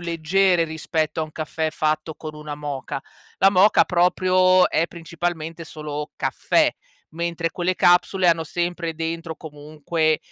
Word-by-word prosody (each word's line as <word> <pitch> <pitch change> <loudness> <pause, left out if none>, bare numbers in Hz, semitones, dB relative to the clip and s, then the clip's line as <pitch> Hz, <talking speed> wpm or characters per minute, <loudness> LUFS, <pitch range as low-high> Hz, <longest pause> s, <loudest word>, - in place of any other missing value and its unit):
leggere 175 +1 +2
rispetto 160 0 -2
a - - +1
un 155 - -6
caffè 155 +1 -3
fatto 155 0 -1
con 155 -1 -8
una 150 -1 -7
moka. 140 -2 -5 0.4
La 195 - +6
moka, 195 +2 +5
proprio, 185 +1 +3
è 165 +2 +1
principalmente 165 -1 -5
solo 150 -2 -6
caffè, - - +2 0.4
mentre 165 0 -2
quelle 180 +1 -1
capsule 180 +1 +3
hanno 165 -1 +4
sempre 170 +1 -3
dentro 165 0 -4
comunque, 155 +1 -2
165 Hz, 135 wpm, -22 LUFS, 155-175 Hz, 0.4 s, La